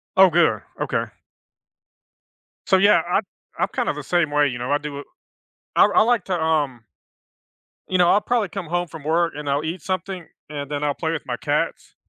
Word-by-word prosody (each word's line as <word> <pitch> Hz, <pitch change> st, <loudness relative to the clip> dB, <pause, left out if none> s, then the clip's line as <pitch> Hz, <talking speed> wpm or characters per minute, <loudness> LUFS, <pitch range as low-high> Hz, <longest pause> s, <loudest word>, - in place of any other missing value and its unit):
Oh, 190 Hz, 0 st, +8 dB
good, 170 Hz, 0 st, +3 dB, 0.2 s
okay. -, -, -1 dB, 1.6 s
So, 190 Hz, -, +5 dB
yeah, 195 Hz, -4 st, +5 dB
I 180 Hz, +3 st, +2 dB, 0.4 s
I'm -, -, +1 dB
kind -, -, -2 dB
of -, -, -1 dB
the -, -, -5 dB
same 170 Hz, -4 st, +1 dB
way, 145 Hz, -1 st, +3 dB
you 120 Hz, -1 st, -4 dB
know. 125 Hz, +3 st, -4 dB
I 145 Hz, -, +3 dB
do 145 Hz, -1 st, -6 dB
a -, -, -8 dB, 0.7 s
I -, -, +8 dB
I -, -, +4 dB
like 230 Hz, -4 st, +2 dB
to, 180 Hz, -2 st, -1 dB
um 145 Hz, -7 st, 0 dB, 1.0 s
you 185 Hz, -, +1 dB
know, 175 Hz, -1 st, +5 dB
I'll 205 Hz, -, +5 dB
probably 230 Hz, -4 st, 0 dB
come 175 Hz, 0 st, -6 dB
home 175 Hz, +1 st, -1 dB
from 155 Hz, -3 st, -10 dB
work, 165 Hz, +1 st, +1 dB
and 150 Hz, -1 st, -5 dB
I'll 140 Hz, +2 st, 0 dB
eat 165 Hz, +1 st, -4 dB
something, 185 Hz, -2 st, -4 dB, 0.2 s
and 145 Hz, -1 st, -6 dB
then 145 Hz, 0 st, -2 dB
I'll 145 Hz, -1 st, 0 dB
play 160 Hz, -1 st, -2 dB
with 160 Hz, -, -4 dB
my -, -, -2 dB
cats. -, -, -2 dB
165 Hz, 205 wpm, -22 LUFS, 145-185 Hz, 1.6 s, Oh